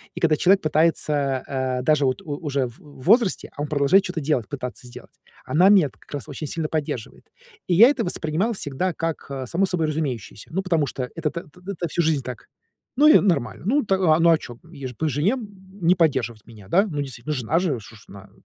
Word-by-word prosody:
и - - -5
когда 160 -2 +3
человек 190 +5 +4
пытается, 150 -4 +1
э, 130 -2 -2
даже 145 0 +3
вот 130 -1 0
у 150 - -6
уже 140 -3 0
в 120 - -14
в 145 -4 -15
возрасте, 225 0 +3
а 145 - -5
он 150 - -2
продолжает 145 +6 +3
чё-то 180 -2 -4
делать, 135 -7 0
пытаться 125 -3 -6
сделать. 120 - -14 0.3
Она 180 +5 +4
меня-то 185 -9 +4
как - - -22
раз 145 - -5
очень 145 +2 -6
сильно 160 +1 -3
поддерживает. 150 -7 -4 0.4
И 180 - +1
я 230 +8 +8
это 265 -5 0
воспринимал 175 +4 -1
всегда 175 0 -2
как, 165 0 -3
э, 135 -1 -4
само 180 +9 +1
собой 175 -4 -1
разумеющееся. 135 -9 -4
Ну, 190 +4 -1
потому 165 -5 +1
что 125 0 -4
это 165 -2 -1
то 170 - -6
то 180 - -20 0.2
то 170 - -1
всю 170 - 0
жизнь 155 -4 +1
так. 125 -3 -8 0.5
Ну, 295 +3 +6
и 310 - +8
нормально. 140 - 0
Ну, 285 +6 +2
т 195 - +1
а 165 -4 +3
ну, 170 0 +5
а 160 - +5
чё? 120 -5 -10
Е, 140 -5 -7
по 160 - 0
жене 150 - +1
н 250 -5 -5 0.3
не 170 +2 +5
поддерживать 130 - 0
меня, 105 -5 -14
да? 190 - +3
Ну, 150 -5 -3
действительно, 135 +1 -5
ну, - - -2
жена 125 +8 +1
же 175 -6 0
уж 115 - -9
ш 110 - -14
она, 100 0 -12
155 Hz, 230 wpm, -23 LUFS, 130-175 Hz, 0.5 s, я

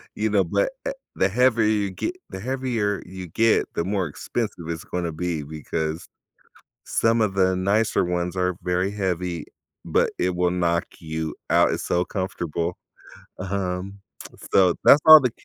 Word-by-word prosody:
you - - 0
know, - - +3
but, - - 0
eh - - 0 0.2
the 95 - +3
heavier 120 +1 +3
you 105 -2 +1
ge 335 - -2 0.2
the - - -7
heavier 120 -4 -1
you 95 0 -8
get, 110 +7 +2
the 85 - -1
more 95 0 -1
expensive 85 +2 -4
it's 80 -1 -4
gonna 90 -2 -3
be 85 0 -3
because 80 +2 -4 0.8
some 115 0 +2
of 105 -3 +1
the 95 -1 +3
nicer 100 +4 +2
ones 90 0 -2
are 90 -1 0
very 90 +2 0
heavy, 90 -4 -2 0.4
but - - +2
it 90 0 0
will 90 0 +1
knock 85 -1 +1
you 80 -1 -4 0.2
out, - - +4
it's - - -3
so 90 0 +1
comfortable, 90 -2 -3 0.6
um, 95 +1 -3 0.5
so 90 -2 +5
that's 145 - +8
all 155 -1 +12
the 125 - +1
90 Hz, 160 wpm, -24 LUFS, 85-105 Hz, 0.8 s, all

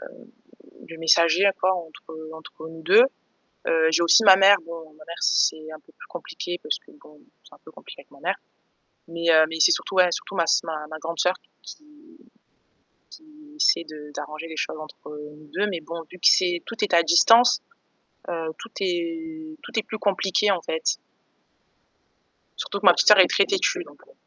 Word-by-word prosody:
heu, - - -11 0.8
le 165 0 -11
messager 170 +3 +3
à 200 - +4
quoi 185 0 0
entre 160 -2 -10 0.2
entre 160 0 -12
nous 160 0 -12
2. 440 - +6 0.7
Heu, 160 -1 +2
j'ai 170 - +2
aussi 195 +6 +5
ma 190 -2 +8
mère, 195 +1 +6
bon 165 -2 -10
ma 155 0 -17
mère 170 +1 -9
c'est 155 0 0
un 155 - -10
peu 160 - -25
plus - - -16
compliqué 175 0 -7
parce 150 - -2
que - - -22
bon, 150 0 -20 0.2
c'est - - -20
un - - -23
peu - - -15
compliqué - - -14
avec - - -28
ma - - -18
mère, - - -1 0.7
mais, 170 0 -1
heu, 160 -1 +5
mais 160 - -6
c'est - - +6
surtout 190 - -3
surtout 195 - -6
ma 170 - +2
s - - +2
ma 155 -1 -7
grande 165 +2 -6
sœur 180 +1 +1 0.3
qui 305 - -13 1.3
qui 305 -1 -18
essaie 305 - +2
de 150 -1 -12
d'arranger 155 +3 -7
les 160 - -9
choses 155 - -4
entre 155 -1 -12 0.3
nous 155 -1 -18
2 210 - 0
mais 175 -4 -4
bon, 165 +2 -8
vu 180 - -12
que - - -2
c'est, 175 -2 +2
tout 230 - -8
est 185 - -1
à 170 - +5
distance, 230 +9 +5 0.7
heu, 165 -1 -4
tout 230 - -11
est 325 -3 -5
tout - - -12
est 220 - +1
plus 220 - -8
compliqué 200 0 0
en 195 - -1
fait. - - -2 1.6
Surtout 200 - -5
que 205 - -3
ma 180 - +9
petite - - +2
sœur 210 -2 +8
est 185 - +8
très 200 - +2
têtue, 380 -1 -1
donc, - - -19
heu - - -22
175 Hz, 200 wpm, -23 LUFS, 160-220 Hz, 1.6 s, ma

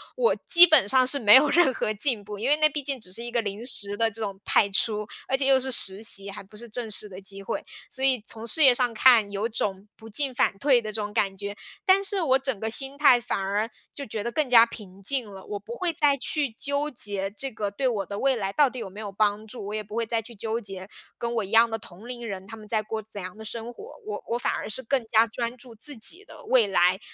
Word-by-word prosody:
我 - - +2
基 345 0 +10
本 310 - +5
上 255 +3 +4
是 280 +2 +3
没 210 -4 +6
有 275 +3 +6
任 330 -6 +4
何 215 - -2
进 215 0 -2
步， 210 0 -8
因 230 - -2
为 290 - +4
那 305 0 +4
毕 295 0 -4
竟 275 -1 -3
只 185 -5 -6
是 230 +5 -5
一 240 - -6
个 235 -1 0
临 210 +2 -6
时 205 -5 +4
的 225 +1 +2
这 225 +1 -6
种 200 -2 -4
派 200 - +3
出， 210 +2 0 0.2
而 265 - +1
且 265 0 0
又 270 -1 +5
是 260 0 -1
实 195 -3 +5
习， 200 -2 +3
还 195 - -8
不 195 +2 -19
是 235 +2 -7
正 225 +1 -4
式 210 0 -3
的 185 -1 -10
机 195 0 -6
会。 195 - -5 0.2
所 265 0 -2
以 255 -5 +1
从 225 0 -7
事 305 +7 +2
业 265 -3 +7
上 245 -1 0
看， 225 -2 +5
有 205 +3 -2
种 200 -3 -4
不 225 - -13
进 270 +4 -1
反 195 - +1
退 265 -2 +3
的 215 -1 -6
这 215 - -2
种 205 0 -5
感 205 -3 -1
觉， 200 +1 -6 0.3
但 385 0 +5
是 395 -1 0
我 265 -5 +3
整 265 -4 -2
个 220 - -3
心 270 +4 -2
态 280 -4 +5
反 240 -3 -3
而 200 +3 -1 0.3
就 280 - -6
觉 215 -2 -5
得 235 - -3
更 300 +4 0
加 240 -2 +7
平 200 -5 -8
静 255 +5 0
了。 195 -2 -11
我 205 - -5
不 225 +4 -9
会 355 +3 -1
再 295 -4 +2
去 280 0 -2
纠 285 +6 -3
结 200 -5 -3
这 270 +7 -5
个 210 -3 -4
对 260 +6 -1
我 215 -5 -2
的 200 0 -6
未 270 -1 +2
来 195 -4 -3
到 290 +1 +4
底 255 - -10
有 230 - -5
没 205 - -11
有 210 -2 -6
帮 210 +1 0
助， 215 -2 -8
我 205 - -6
也 215 - -2
不 210 +1 -10
会 230 0 -1
再 225 0 -2
去 235 +2 -14
纠 225 +3 -3
结 195 -3 -8 0.3
跟 235 0 -3
我 225 -2 -1
一 195 - -8
样 230 +2 +5
的 225 -1 -4
同 200 +2 -14
龄 240 -1 -7
人， 190 -2 -6
他 225 - -9
们 215 -1 -13
在 215 0 0
过 220 +1 -5
怎 210 -1 -11
样 185 +1 -8
的 220 - -11
生 230 +2 -7
活。 440 - -12
我 425 - -6
我 235 - -1
反 245 - -1
而 - - -5
是 260 +5 -4
更 260 +1 0
加 220 0 +4
专 235 +1 -5
注 245 -1 -12
自 270 +5 -9
己 345 - +1
的 475 - -13
未 250 - +3
来， 185 -1 +2
225 Hz, 300 characters per minute, -25 LUFS, 205-260 Hz, 0.3 s, 基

